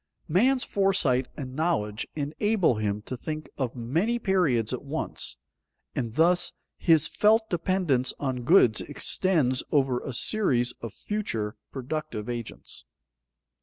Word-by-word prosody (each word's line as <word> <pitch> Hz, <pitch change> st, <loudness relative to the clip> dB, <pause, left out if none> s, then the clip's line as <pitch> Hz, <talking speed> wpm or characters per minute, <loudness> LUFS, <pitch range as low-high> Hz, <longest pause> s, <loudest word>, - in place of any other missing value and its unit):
_Man's 245 Hz, -, +3 dB
foresight 165 Hz, -11 st, +2 dB
and 130 Hz, -3 st, -6 dB
knowledge 125 Hz, -10 st, -1 dB
enable 160 Hz, -, +1 dB
him 105 Hz, -1 st, -2 dB
to 130 Hz, -, -5 dB
think 155 Hz, +4 st, -5 dB
of 130 Hz, -3 st, -3 dB
many 165 Hz, -, 0 dB
periods 155 Hz, -, +1 dB
at 125 Hz, -, -3 dB
once, 140 Hz, -, -3 dB, 0.6 s
and 115 Hz, -2 st, -3 dB
thus 175 Hz, +2 st, +3 dB, 0.2 s
his 160 Hz, -3 st, +3 dB
felt 220 Hz, +5 st, +3 dB
dependence 170 Hz, -7 st, +1 dB
on 130 Hz, -3 st, -2 dB
goods 120 Hz, -, +5 dB
extends 145 Hz, -3 st, +2 dB
over 135 Hz, -4 st, +2 dB
a 135 Hz, -, -6 dB
series 125 Hz, -, +1 dB
of 115 Hz, -, -5 dB
future 115 Hz, -, -3 dB, 0.2 s
productive 135 Hz, -5 st, -4 dB
agents. 120 Hz, -2 st, -6 dB
145 Hz, 125 wpm, -27 LUFS, 125-180 Hz, 0.6 s, goods